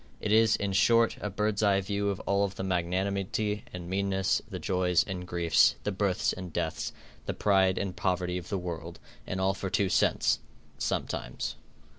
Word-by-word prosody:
It 105 Hz, -, -2 dB
is, 110 Hz, 0 st, +5 dB
in 100 Hz, -1 st, -2 dB
short, 115 Hz, +4 st, +4 dB
a 105 Hz, -, -2 dB
bird's 105 Hz, +1 st, -1 dB
eye 100 Hz, -2 st, +4 dB
view 100 Hz, +1 st, -1 dB
of 100 Hz, -, -2 dB
all 100 Hz, 0 st, +1 dB
the 95 Hz, 0 st, -6 dB
magnanimity 95 Hz, +3 st, -1 dB
and 90 Hz, -1 st, -7 dB
meanness, 95 Hz, 0 st, +1 dB
the -, -, -5 dB
joys 90 Hz, -2 st, +2 dB
and 90 Hz, -2 st, -6 dB
griefs, 85 Hz, -2 st, +4 dB
the 105 Hz, -, -1 dB
births 95 Hz, -2 st, 0 dB
and 90 Hz, -2 st, -7 dB
deaths, -, -, -2 dB, 0.4 s
the -, -, -2 dB
pride 95 Hz, -2 st, +3 dB
and 95 Hz, -2 st, -2 dB
poverty 90 Hz, -1 st, -1 dB
of 90 Hz, -, -11 dB
the 100 Hz, -, -1 dB
world, 85 Hz, -2 st, -5 dB, 0.3 s
and 95 Hz, -, -3 dB
all 95 Hz, +1 st, +2 dB
for 95 Hz, 0 st, -4 dB
two 95 Hz, 0 st, +1 dB
cents -, -, +2 dB, 0.4 s
sometimes. 60 Hz, -, -3 dB
95 Hz, 175 wpm, -29 LUFS, 90-100 Hz, 0.4 s, is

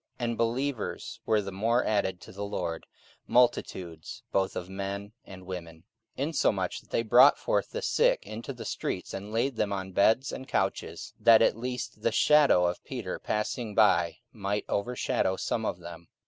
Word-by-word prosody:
44:005:014 120 Hz, -, -2 dB
And 115 Hz, -, -3 dB
believers 120 Hz, +1 st, -2 dB
were 110 Hz, -1 st, +3 dB
the 100 Hz, -, -5 dB
more 115 Hz, +6 st, +1 dB
added 95 Hz, -4 st, 0 dB
to -, -, -12 dB
the 100 Hz, +2 st, -6 dB
Lord, 90 Hz, -5 st, -4 dB, 0.4 s
multitudes 95 Hz, -9 st, 0 dB
both 95 Hz, -1 st, 0 dB
of 90 Hz, -, -4 dB
men 100 Hz, +2 st, -5 dB
and 95 Hz, -1 st, -11 dB
women.) 85 Hz, -3 st, -8 dB, 0.3 s
44:005:015 135 Hz, -, -1 dB
Insomuch 100 Hz, -, 0 dB
that -, -, -27 dB
they 115 Hz, -, 0 dB
brought 110 Hz, -, +7 dB
forth -, -, 0 dB
the -, -, -5 dB
sick -, -, +2 dB
into 110 Hz, +5 st, -6 dB
the 120 Hz, -4 st, -8 dB
streets, 90 Hz, -, -4 dB
and 100 Hz, +2 st, -6 dB
laid 115 Hz, +3 st, 0 dB
them 105 Hz, -1 st, 0 dB
on 95 Hz, -1 st, -3 dB
beds 110 Hz, +8 st, +3 dB
and 130 Hz, -, -7 dB
couches, -, -, -2 dB
that 115 Hz, -1 st, +7 dB
at -, -, +4 dB
the 115 Hz, -, -14 dB
least 120 Hz, -3 st, -5 dB
the 115 Hz, -, +1 dB
shadow 140 Hz, -6 st, +5 dB
of 85 Hz, 0 st, -2 dB
Peter 120 Hz, -9 st, -5 dB
passing 105 Hz, 0 st, -3 dB
by 85 Hz, -6 st, +4 dB, 0.2 s
might 105 Hz, -1 st, -2 dB
overshadow 100 Hz, -3 st, 0 dB
some -, -, -2 dB
of -, -, -2 dB
them. 85 Hz, -1 st, -11 dB
105 Hz, 180 wpm, -28 LUFS, 95-115 Hz, 0.4 s, brought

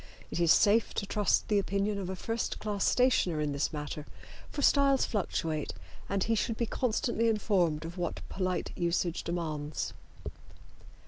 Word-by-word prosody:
It -, -, -2 dB
is 170 Hz, -2 st, +4 dB
safe 215 Hz, +2 st, +4 dB
to -, -, -1 dB
trust 205 Hz, 0 st, +1 dB
the 210 Hz, -1 st, +3 dB
opinion 200 Hz, +1 st, -1 dB
of 185 Hz, -2 st, -4 dB
a 190 Hz, -, -3 dB
first 225 Hz, +5 st, -2 dB
class 205 Hz, -2 st, -2 dB
stationer 230 Hz, -10 st, +3 dB
in 150 Hz, -1 st, 0 dB
this 140 Hz, +1 st, -1 dB
matter, 150 Hz, -1 st, -5 dB, 0.4 s
for 285 Hz, -, -4 dB
styles 275 Hz, -1 st, +4 dB
fluctuate, 160 Hz, -7 st, -2 dB, 0.4 s
and 195 Hz, -1 st, +1 dB
he 225 Hz, -, +1 dB
should 225 Hz, +1 st, 0 dB
be 235 Hz, -, 0 dB
constantly 230 Hz, 0 st, 0 dB
informed 185 Hz, -8 st, +1 dB
of 170 Hz, +2 st, -7 dB
what 175 Hz, -2 st, -3 dB
polite 185 Hz, -1 st, -2 dB
usage 170 Hz, 0 st, 0 dB
demands. 155 Hz, -3 st, -3 dB
195 Hz, 155 wpm, -30 LUFS, 165-220 Hz, 0.4 s, is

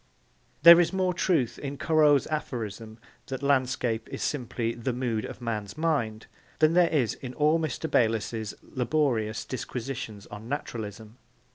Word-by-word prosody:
There 170 Hz, +1 st, +11 dB
is 175 Hz, -, +3 dB
more 185 Hz, -1 st, 0 dB
truth 165 Hz, -9 st, 0 dB
in 140 Hz, 0 st, -5 dB
Corot's 150 Hz, -3 st, +4 dB
aphorism 115 Hz, -7 st, -4 dB, 0.3 s
that 135 Hz, +1 st, -5 dB
a -, -, -1 dB
landscape 130 Hz, -4 st, 0 dB
is -, -, -5 dB
simply 120 Hz, -4 st, -2 dB
'the 120 Hz, +2 st, -3 dB
mood 120 Hz, -3 st, -2 dB
of -, -, -8 dB
a -, -, -12 dB
man's 105 Hz, -2 st, -4 dB
mind' 130 Hz, -10 st, -1 dB, 0.3 s
than 155 Hz, +1 st, +4 dB
there 175 Hz, -1 st, +5 dB
is 130 Hz, -8 st, +1 dB
in 130 Hz, -1 st, -8 dB
all 155 Hz, +2 st, +3 dB
Mr. 160 Hz, 0 st, -3 dB
Bayliss's 110 Hz, -4 st, 0 dB
laborious 125 Hz, -4 st, -1 dB
disquisitions 120 Hz, -4 st, -5 dB
on 105 Hz, +3 st, -9 dB
naturalism. 110 Hz, -5 st, -6 dB
125 Hz, 150 wpm, -27 LUFS, 110-150 Hz, 0.3 s, There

